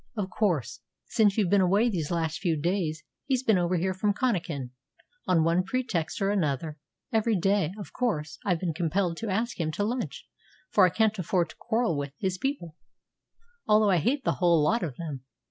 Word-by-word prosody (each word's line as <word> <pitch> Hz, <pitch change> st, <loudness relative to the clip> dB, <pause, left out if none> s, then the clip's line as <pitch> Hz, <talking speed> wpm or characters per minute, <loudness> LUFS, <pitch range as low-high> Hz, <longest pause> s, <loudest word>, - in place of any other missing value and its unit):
"Of 195 Hz, -3 st, -2 dB
course. 175 Hz, -, 0 dB, 0.3 s
Since 215 Hz, -4 st, +2 dB
you've 200 Hz, -5 st, +2 dB
been 200 Hz, -1 st, +5 dB
away 200 Hz, +6 st, +3 dB
these 170 Hz, -10 st, -2 dB
last 165 Hz, -2 st, -1 dB
few 170 Hz, -5 st, 0 dB
days 165 Hz, -2 st, -1 dB, 0.2 s
he's 260 Hz, -2 st, +1 dB
been 220 Hz, -7 st, +3 dB
over 175 Hz, +1 st, +1 dB
here 185 Hz, +2 st, 0 dB
from 200 Hz, +2 st, 0 dB
Connachan, 170 Hz, -, -1 dB, 0.6 s
on 170 Hz, -3 st, +3 dB
one 165 Hz, +2 st, +3 dB
pretext 190 Hz, -6 st, -2 dB
or 195 Hz, -, +2 dB
another, 155 Hz, -5 st, -1 dB, 0.3 s
every 225 Hz, 0 st, +2 dB
day. 195 Hz, -2 st, +1 dB
Of 205 Hz, -, -9 dB
course 155 Hz, -12 st, -2 dB
I've 180 Hz, -5 st, +1 dB
been 175 Hz, -3 st, -1 dB
compelled 170 Hz, +2 st, 0 dB
to 225 Hz, -, -4 dB
ask 225 Hz, +4 st, -1 dB
him 160 Hz, -2 st, 0 dB
to 205 Hz, -, -1 dB
lunch, 240 Hz, +4 st, -3 dB, 0.4 s
for 190 Hz, -3 st, +6 dB
I -, -, +1 dB
can't 215 Hz, +3 st, +1 dB
afford 175 Hz, -1 st, 0 dB
to -, -, -17 dB
quarrel 230 Hz, -6 st, 0 dB
with 140 Hz, -1 st, -4 dB
his 185 Hz, -1 st, -2 dB
people, 180 Hz, -, -3 dB, 0.9 s
although 210 Hz, -1 st, +5 dB
I 180 Hz, -, +4 dB
hate 265 Hz, -, 0 dB
the -, -, +2 dB
whole 170 Hz, -3 st, +4 dB
lot 230 Hz, +9 st, +2 dB
of 150 Hz, -7 st, -3 dB
them. 145 Hz, -5 st, -6 dB
185 Hz, 195 wpm, -27 LUFS, 165-215 Hz, 0.9 s, for